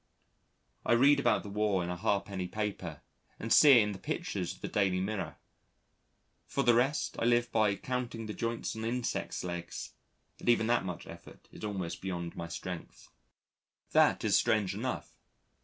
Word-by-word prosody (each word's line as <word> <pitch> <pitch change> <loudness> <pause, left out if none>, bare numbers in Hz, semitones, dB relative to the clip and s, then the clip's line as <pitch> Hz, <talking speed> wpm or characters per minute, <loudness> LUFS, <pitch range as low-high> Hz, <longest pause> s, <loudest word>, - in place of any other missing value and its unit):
I - - +3
read 140 +4 +6
about 120 -5 +2
the 100 - -7
War 100 -2 +1
in 85 - -3
a - - -2
ha'penny 100 -1 -1
paper, 95 -7 -4 0.4
and 115 0 0
see 145 -2 +9
it 120 -4 +7
in 105 - -2
the 95 - -7
pictures - - -3
of - - -22
the - - -3
Daily 95 -3 +1
Mirror. 100 +2 -3 1.1
For 140 - 0
the 120 - +5
rest, 130 +6 +1
I - - 0
live 120 0 +3
by 105 -3 +3
counting 125 0 -4
the 105 - -5
joints 115 0 -3
on 110 - -5
insects' 120 +1 -2
legs 85 -1 -5 0.5
and - - -2
even 120 -2 +4
that 120 -3 +2
much 90 -2 -5
effort - - -13
is - - -12
almost 95 -5 -4
beyond 85 -3 -4
my 85 - -5
strength. 90 +1 -7 0.8
That - - +4
is - - +3
strange 105 -4 +2
enough. 125 +5 -4
105 Hz, 175 wpm, -31 LUFS, 95-120 Hz, 1.1 s, see